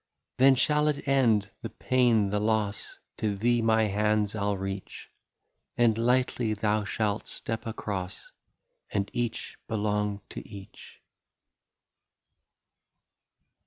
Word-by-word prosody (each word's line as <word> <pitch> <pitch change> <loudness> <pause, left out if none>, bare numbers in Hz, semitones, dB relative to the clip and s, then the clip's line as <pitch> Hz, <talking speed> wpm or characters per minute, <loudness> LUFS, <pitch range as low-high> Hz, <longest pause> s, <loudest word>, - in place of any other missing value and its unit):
" - - -58
Then 135 +1 +7
shall 150 +3 +2
it 150 -1 -1
end, 115 -8 +3
the - - -5
pain, 120 -6 +2
the 105 - +1
loss, 105 -1 -1 0.2
To 105 -2 -1
thee 120 +3 +2
my 110 0 +3
hands 105 0 +1
I 110 - -3
'11 100 -1 0
reach; 95 0 -6 0.7
And 120 -2 +4
lightly 120 -1 +1
thou 105 0 0
shalt 105 0 -1
step 115 +1 -4
across. 100 -3 -5 0.6
And 100 0 -2
each 120 -2 -3
belong 105 -2 -1
to - - -7
each." 100 -3 -12
110 Hz, 120 wpm, -28 LUFS, 105-120 Hz, 0.7 s, Then